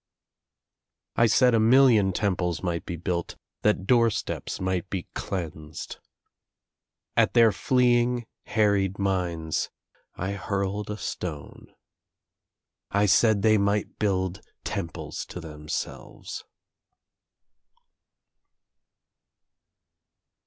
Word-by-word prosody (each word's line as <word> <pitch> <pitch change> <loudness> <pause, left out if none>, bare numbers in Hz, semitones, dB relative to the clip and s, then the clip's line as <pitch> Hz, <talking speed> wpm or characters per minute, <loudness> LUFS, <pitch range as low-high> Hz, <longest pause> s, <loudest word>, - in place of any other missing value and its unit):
I 115 - +5
said 125 +3 +4
a 115 - +4
million 115 -4 +5
temples 90 -4 -1
might 85 -2 -2
be 90 - -3
built, 85 +1 -3 0.3
that 105 -3 +2
door 115 +1 +5
steps 105 - -4
might 95 0 -2
be 95 -3 -3
cleansed. 80 -4 -5 1.2
At - - +3
their 115 -2 +7
fleeing 120 0 +2 0.2
harried 100 -3 +2
minds 90 -5 -1 0.5
I 95 +2 -3
hurled 100 +1 -2
a 105 - -3
stone. 85 -6 -6 1.2
I 100 +1 +2
said 105 +1 +4
they 110 -1 +5
might 100 +1 0
build 95 -2 0 0.2
temples 80 - -4
to - - -7
themselves. 75 -2 -6
100 Hz, 90 wpm, -26 LUFS, 90-110 Hz, 1.2 s, their